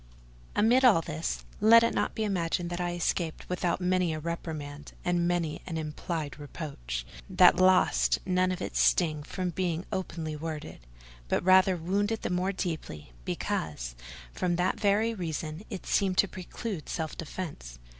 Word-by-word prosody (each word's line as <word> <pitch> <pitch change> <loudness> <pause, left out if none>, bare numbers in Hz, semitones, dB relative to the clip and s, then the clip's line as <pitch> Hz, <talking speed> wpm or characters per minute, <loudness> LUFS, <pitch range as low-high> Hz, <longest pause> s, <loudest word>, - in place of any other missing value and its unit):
Amid 235 +5 +4
all 220 -10 +7
this, 160 0 -3
let 230 +2 +8
it 230 - +2
not - - -1
be 220 - -1
imagined 175 -3 -1
that 175 +1 -2
I 175 0 -1
escaped 170 -1 -2
without 180 -1 0
many 180 -2 +1
a - - -4
reprimand, 150 -3 -5
and 175 -1 +2
many 170 -3 -1
an 165 -3 -3
implied 155 -1 -4
reproach, 100 - -5 0.2
that 180 -1 +6
lost 185 0 +4
none 185 0 +2
of 185 - -3
its - - -2
sting 155 -4 +3
from 180 +4 -3
not 170 - -8
being 175 -1 -1
openly 165 -4 -3
worded; 155 0 -6 0.5
but - - 0
rather 185 0 +6
wounded 205 +6 -1
the - - -1
more 180 +2 +1
deeply, 160 - -5
because, - - -3 0.4
from 175 -1 0
that 180 +1 0
very 215 +2 +2
reason, 160 -4 -4
it 195 -5 -6
seemed 190 -2 +1
to 200 - +5
preclude 185 0 -6
self 160 -2 -3
defence. 145 - -6
175 Hz, 160 wpm, -29 LUFS, 155-185 Hz, 0.5 s, let